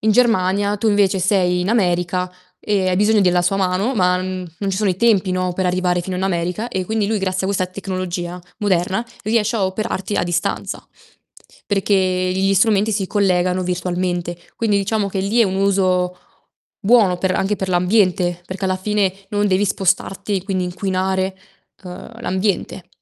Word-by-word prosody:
in 215 0 +3
Germania, 205 -3 +2
tu 220 +3 -2
invece 205 -2 +3
sei 180 -1 +2
in 180 - -1
America 180 -4 0 0.3
e 195 -3 0
hai 180 - +1
bisogno 210 +2 +3
della 180 -2 +3
sua 180 +3 +1
mano, 195 +6 0
ma 180 -2 +3
n 185 - -3 0.2
mhmm, - - -8
non 200 -1 -2
ci 190 - -2
sono 205 -1 +1
i 180 - -2
tempi, 200 -3 +3
no, 185 0 -1
per 185 0 0
arrivare 180 0 +1
fino 185 +1 -4
in 180 - -3
America 180 +4 -1
e 190 -5 -2
quindi 215 +1 -1
lui, 220 -1 0
grazie 185 -1 -1
a - - 0
questa 190 -2 0
tecnologia 180 -2 -5 0.2
moderna, 190 +1 0 0.2
riesce 220 +1 +1
a 200 - +1
operarti 195 0 -3
a - - +1
distanza, 175 0 -2 0.8
perché 200 0 +1 0.4
gli 195 +1 +2
strumenti 210 +2 +3
si 200 -2 -1
collegano 185 -2 +1
virtualmente. 175 -1 -2 0.2
Quindi, 215 -3 +1
diciamo 200 0 0
che 195 - -4
lì 205 +5 +1
è 230 - +6
un 190 -1 -1
uso 185 -2 +1 0.6
buono 210 -4 +4
per 190 0 0
anche 195 +3 0
per 190 - -3
l'ambiente, 180 -1 +2
perché 190 +1 -5
alla 185 0 +1
fine 200 0 0 0.2
non 205 0 +1
devi 190 +1 +2
spostarti 195 +1 0
e 185 - -4
quindi 190 -2 -1
inquinare, 190 +1 -1 0.5
uhm, 185 +5 -10
l'ambiente 190 -3 -2
190 Hz, 180 wpm, -19 LUFS, 180-205 Hz, 0.8 s, è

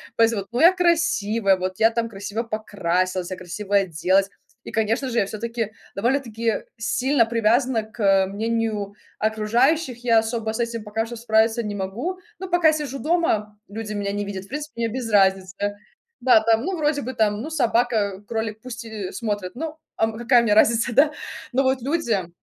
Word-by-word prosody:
поэтому, 225 -3 +2
ну, 240 - -2
я 345 +3 +8
красивая, 270 - +2
вот 185 0 -4
я 225 +1 +5
там 230 0 -1
красиво 200 +2 -4
покрасилась, 185 -5 -1
я 185 - -5
красивая 200 +2 0
оделась. 185 +3 +1 0.3
И - - -8
конечно 225 +4 0
же, 235 - +1
я - - +2
всё-таки 230 +1 -4 0.2
довольно-таки 230 -1 0
сильно 255 +2 +2
привязана 230 +1 +2
к, 215 +2 -17
э, 195 -1 +4
мнению 215 0 -2 0.3
окружающих, 240 +5 +1
я 230 -2 +5
особо 225 0 -2
с 230 - -4
этим 230 -1 -2
пока 220 +1 -2
что 240 - -7
справиться 225 0 +2
не 210 -1 -4
могу, 225 - -4 0.2
но 380 - -5
пока 345 -3 +4
сижу 280 -3 -4
дома, 240 -11 0
люди 215 +1 -5
меня 200 -1 -2
не 205 0 -2
видят, 195 -1 -6
в - - -20
принципе, 300 +2 -5
мне 230 - +2
без 235 0 -4
разницы. 195 0 +2 0.5
Да 255 -4 +7
там. 225 +1 +2
Ну, 375 -1 -2
вроде 295 -2 +1
бы 260 - -4
там, 210 -2 +1
ну, 300 - -5
собака, 230 -8 +1
кролик, 220 -1 -3
пусть 245 -1 -7
и 215 -4 -5
смотрят. 205 -3 -3
Ну, 315 +3 -5 0.2
а, - - 0
м, 225 - -4
а - - -8
какая 240 0 +4
мне 210 - +3
разница, 230 +2 +4
да? 295 +4 +5 0.4
Но 265 +2 +3
вот 260 -1 +1
люди 235 - -1
225 Hz, 185 wpm, -23 LUFS, 205-250 Hz, 0.5 s, я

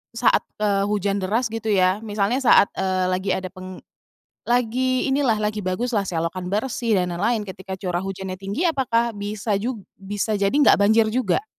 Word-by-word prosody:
saat, 235 - +3 0.2
eee, 200 -1 +1
hujan 205 -1 0
deras 220 +5 -1
gitu 225 0 -5
ya, 185 0 +3
misalnya 210 +3 0
saat, 245 -6 +5
eee, 185 -1 0
lagi 190 +2 -2
ada 185 -1 -5
peng 185 -1 -9 0.7
lagi 250 +2 +1
inilah 265 -4 +2
lagi 210 0 -2
bagus 205 +6 -2
lah, 210 -3 +2
selokan 170 +2 -3
bersih 225 0 0
dan 180 -1 -2
lain-lain 220 +5 0
ketika 190 0 -7
curah 180 -2 -2
hujannya 190 0 -5
tinggi 200 - -3
apakah 235 -6 +1
bisa 205 +1 -4
jug 225 -2 -4 0.2
bisa 205 +2 -3
jadi 200 - +2
enggak 290 -8 +5
banjir 220 +2 +5
juga? 255 - 0
205 Hz, 170 wpm, -22 LUFS, 190-235 Hz, 0.7 s, saat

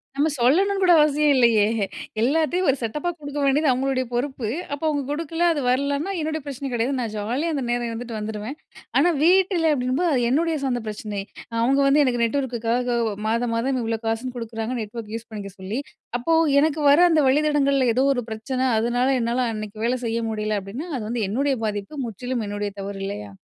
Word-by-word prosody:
நம்ம 295 +3 +2
சொல்லணும்ன்னு 385 +11 +3
கூட 355 -1 +6
அவசியம் 300 0 +3
இல்லயே! 230 -5 +5 0.6
எல்லாத்தையும் 320 +7 +2
ஒரு 270 - +3
செட்டப்பா 300 +10 -2
குடுக்க 290 0 -7
வேண்டியது 285 +3 +3
அவுங்களுடைய 260 0 0
பொறுப்பு. 250 -1 -2 0.3
அப்ப 285 - -5
அவுங்க 290 -2 0
கொடுக்கல, 330 +2 -2
அது 290 - -2
வரலன்னா 280 +7 0
என்னுடைய 315 0 -2
பிரச்சனை 275 0 -5
கிடையாது. 240 +4 0
நான் 230 -3 -3
ஜாலியா 250 +11 -1
அந்த 275 - -1
நேரம் 240 0 0
இருந்துட்டு 230 0 -5
வந்துருவேன். 215 +5 -5 0.4
ஆனா 345 +5 +4
வீட்டுல 360 -2 +4
அப்பிடீங்கும்போது, 265 +6 0
அது 245 - +1
என்னுடைய 320 +5 +1
சொந்த 245 -3 -1
பிரச்சனை. 210 -1 -4 0.4
அவுங்க 270 +4 +3
வந்து 290 +2 +5
எனக்கு 240 -2 0
நெட்வொர்க்குக்காக 245 -1 0 0.3
மாதம், 230 +1 0
மாதம் 255 +3 0
இவ்ளோ 225 -1 -2
காசுன்னு 235 +3 -2
குடுக்குறாங்க, 225 +1 -4
நெட்வொர்க் 215 0 -7
யூஸ் 230 0 -7
பண்ணிக்க 205 -3 -7
சொல்லி. 200 +7 -3 0.4
அப்போ, 325 +7 0 0.3
"எனக்கு 310 0 +1
வர 290 +4 +6
அந்த 310 -2 +4
வழித்தடங்கள்ல 280 -2 +3
ஏதோ 265 +2 +3
ஒரு 245 - -2
பிரச்சனை, 255 +4 -2
அதனால 240 +3 +1
என்னால 240 +2 0
அன்னக்கி 215 0 -6
வேலை 250 +1 0
செய்ய 230 0 -1
முடியல." 215 -1 -1
அப்பிடீன்னா 245 - -7
அது 230 - -5
வந்து 235 -2 -1
என்னுடைய 270 +5 +1
பாதிப்பு. 205 +5 -4
முற்றிலும் 240 +2 -4
என்னுடைய 205 0 -3
தவறு 195 0 -6
இல்லயா! 205 0 -6
250 Hz, 175 wpm, -23 LUFS, 225-290 Hz, 0.6 s, கூட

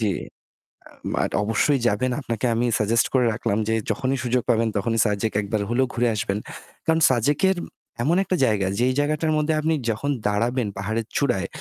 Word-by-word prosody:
জি। 105 -3 +1 0.8
আ - - -20 0.3
মাট - - 0
অবশ্যই 120 +6 +2
যাবেন। 125 +5 +1
আপনাকে 120 -3 -3
আমি 120 +2 +1
suggest 115 +3 +2
করে 125 -2 +3
রাখলাম 105 -2 -1
যে 110 - +1 0.2
যখনই 135 0 0
সুযোগ 125 0 +1
পাবেন 115 0 +3
তখনই 115 +3 0
সাজেক 105 +1 0
একবার 105 +1 -2
হলেও 130 +2 +2
ঘুরে 120 +1 +1
আসবেন। 100 -1 -1 0.5
কারণ 160 0 +2
সাজেকের 145 - +2 0.5
এমন 165 +6 +2
একটা 185 - -1
জায়গা 100 -4 +1
যেই 130 +1 +2
জায়গাটার 155 +2 0
মধ্যে 150 +1 +1
আপনি 160 +1 +1 0.2
যখন 115 +6 -1 0.2
দাঁড়াবেন 115 +3 0
পাহাড়ের 110 +3 -2
চূড়ায় 100 -9 0
120 Hz, 170 wpm, -23 LUFS, 110-140 Hz, 0.8 s, করে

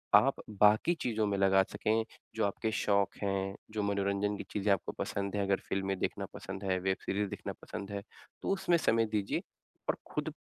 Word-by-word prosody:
आप - - +5 0.2
बाकी 105 +11 +6
चीज़ 110 -3 0
में 100 -2 +2
लगा 95 0 +5
सकें 110 +1 +1 0.3
जो 110 - +2
आपके 110 +2 -1
शौक 100 -2 +2
हैं, 95 -1 0 0.2
जो 105 -1 -1
मनोरंजन 100 0 +1
की - - -5
चीज़ें 105 0 +1
आपको 95 - -2
पसंद 100 0 -2
हैं 100 - +1
अगर 100 0 +2
फ़िल्में 95 0 0
देखना - - -1
पसंद 95 +1 -6
है, 95 -1 +1
वेब 95 +1 +1
सीरीज़ 100 0 0
देखना - - -5
पसंद 100 +1 -6
है 100 -1 -3 0.4
तो - - -2
उसमें 190 -3 +3
समय 115 -8 +3
दीजिए 105 -2 -1 0.5
और - - +2 0.2
खुद - - -2
100 Hz, 190 wpm, -32 LUFS, 95-105 Hz, 0.5 s, बाकी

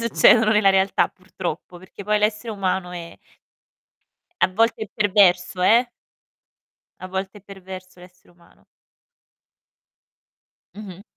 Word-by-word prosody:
succedono 225 -1 +4
nella 210 -2 +4
realtà 195 0 +1
purtroppo, 180 -2 -8
perché 190 +2 -13
poi 210 +1 +1
l'essere 210 +2 -1
umano 190 -3 -2
è 170 -1 -9 1.2
a - - +4
volte 225 +4 0
è 215 - -6
perverso, 190 -3 +2
eh. 235 +6 +4 1.1
A 185 - -8
volte 190 +2 -5
è - - -23
perverso 185 -2 -12
l'essere 180 0 -19
umano. 175 0 -26 2.1
Mh-mh. 195 -3 -11
190 Hz, 115 wpm, -21 LUFS, 185-210 Hz, 2.1 s, succedono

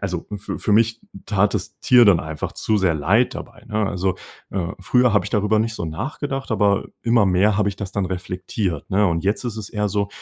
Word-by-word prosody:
also 90 -4 -3
für 105 - -6
für 105 - 0
mich 115 +1 +3 0.3
tat 105 0 +2
das - - -4
Tier 125 -1 +6
dann 95 -5 +5
einfach 80 0 -5
zu 110 -1 0
sehr 95 -4 +2
leid 100 +11 +2
dabei, - - -10
ne? 105 -1 0
Also, 95 -1 -1 0.3
äh, 95 -1 -2
früher 125 -3 +3
habe 100 -3 +2
ich - - -6
darüber 105 +1 +2
nicht 110 +1 0
so 85 - -4
nachgedacht, 135 - -4
aber 100 -3 +2 0.2
immer 115 -3 +3
mehr 95 +3 +3
habe 100 - +2
ich 100 - -5
das 95 -1 -6
dann 100 -2 -1
reflektiert, 90 -1 -4
ne, 100 +2 +3
und 85 -2 0
jetzt 105 +5 0
ist 120 -3 -3
es 105 - -6
eher 105 -2 -1
so, 100 0 0
100 Hz, 225 wpm, -21 LUFS, 95-110 Hz, 0.3 s, Tier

